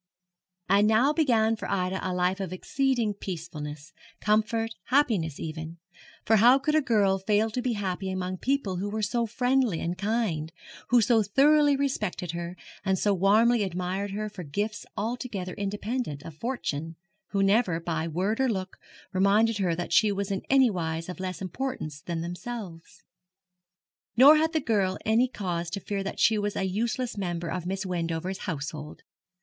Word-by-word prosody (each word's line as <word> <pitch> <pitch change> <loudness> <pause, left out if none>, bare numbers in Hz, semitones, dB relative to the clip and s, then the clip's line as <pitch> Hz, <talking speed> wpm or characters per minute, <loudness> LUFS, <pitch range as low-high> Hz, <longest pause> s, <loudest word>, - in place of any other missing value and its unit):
And 200 +2 +4
now 230 +7 +4
began 230 -8 +3
for - - -6
Ida 190 -1 0
a 185 - -2
life 180 +1 0
of 190 -3 -4
exceeding 240 +3 0
peacefulness, 160 -5 -7 0.3
comfort, 220 +1 +1
happiness 220 - +1
even; 160 +1 -6 0.5
for 220 - +5
how 240 +5 +7
could 285 +3 -1
a 310 - +4
girl 205 -7 +2
fail 210 +3 +1
to 250 - -2
be 250 -1 0
happy 195 -2 -3
among 185 0 -3
people 255 -9 0
who 200 +3 -2
were 215 +1 -3
so 235 +2 0
friendly 245 -4 +1
and 170 +1 -2
kind, 195 -6 -1 0.4
who 245 -1 +5
so 225 +1 +4
thoroughly 285 +7 +4
respected 215 - -2
her, 170 +1 -5 0.3
and 190 -1 +1
so 205 +2 +2
warmly 215 +5 +4
admired 185 +1 -2
her 210 +2 -3
for 205 -3 -8
gifts 205 +8 -3
altogether 215 -5 -3
independent 205 - -3
of 165 - -8
fortune 165 - -3 0.3
who 195 -1 0
never, 195 -4 +3
by 165 -1 -2
word 190 +8 -1
or 265 - +3
look, 190 -4 -3 0.4
reminded 205 +4 +3
her 180 -4 +1
that 175 +1 -4
she 215 -2 +5
was 200 0 -2
in 195 - -1
anywise 180 -11 +2
of 180 - -6
less 185 0 -4
importance 185 - -4
than 170 0 -4
themselves? 175 -1 -7 1.1
Nor 285 +5 +9
had 320 +1 +2
the 315 - +1
girl 200 -6 +1
any 225 +4 +3
cause 175 -7 -3
to 185 - -4
fear 200 +1 -3
that 195 - -5
she 220 -1 +4
was 205 0 -2
a - - -1
useless 225 +4 -2
member 175 -3 -3
of 180 -2 -3
Miss 195 +1 -2
Wendover's 175 +1 -2
household. 150 -1 -6
200 Hz, 165 wpm, -27 LUFS, 180-230 Hz, 1.1 s, Nor